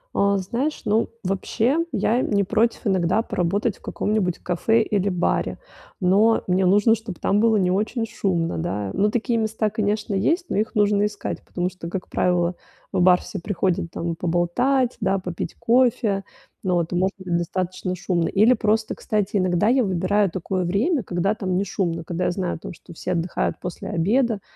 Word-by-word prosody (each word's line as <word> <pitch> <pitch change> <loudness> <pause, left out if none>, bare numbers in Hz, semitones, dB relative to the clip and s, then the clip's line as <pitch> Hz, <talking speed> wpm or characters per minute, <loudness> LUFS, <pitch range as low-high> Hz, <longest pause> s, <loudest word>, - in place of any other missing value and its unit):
А, 200 0 +3
знаешь, 240 +11 -2
ну, 215 +2 +2
вообще, 215 - 0
я, 225 +3 +1
э, - - +2
не 200 -4 +1
против 225 +4 +1
иногда 190 +1 +2
поработать 200 +3 -1
в - - -32
каком-нибудь 205 -5 -1
кафе 220 +6 +1
или 200 -2 0
баре, 180 -2 0 0.4
но 205 +5 +3
мне 185 0 +2
нужно, 205 +4 +5
чтобы 220 -4 -5
там 200 - +2
было 225 0 +4
не 185 -2 +2
очень 215 +4 0
шумно, 175 -7 -1
да. 105 - -3
Ну, 205 +2 +2
такие 235 +1 0
места, 220 -1 -1
конечно, 210 0 -1
есть, 325 - +1
но - - -1
их 215 +3 -1
нужно 205 -1 +3
искать, 210 -1 -5
потому 180 0 -2
что, 170 -2 -8
как 180 +1 -5
правило, 175 -1 +1 0.4
в - - +1
бар 180 0 +6
все - - -6
приходят 175 -2 -1
там 170 0 -3
поболтать, 205 +11 +1
да, 195 -1 +2
попить 180 -3 -5
кофе, 230 -4 +2 0.4
ну 185 -2 0
вот, 170 0 -1
и - - 0
может 190 +3 +1
быть 185 -3 -3
достаточно 185 +1 -3
шумно. 175 -1 0
Или 215 +5 +4
просто, 220 -1 0
кстати, 210 -1 -1
иногда 185 +1 +2
я 255 +1 +4
выбираю 195 +1 +1
такое 185 +1 -2
время, 230 - +1
когда 185 0 0
там 190 -4 -2
не 195 - 0
шумно, 170 -4 -2
когда 170 +2 -3
я - - +2
знаю 180 -1 -2
о - - -9
том, - - -8
что 170 - -14
все 180 +2 -3
отдыхают 170 0 -1
после 185 +2 -6
обеда, 215 +4 +1
195 Hz, 185 wpm, -23 LUFS, 180-215 Hz, 0.4 s, бар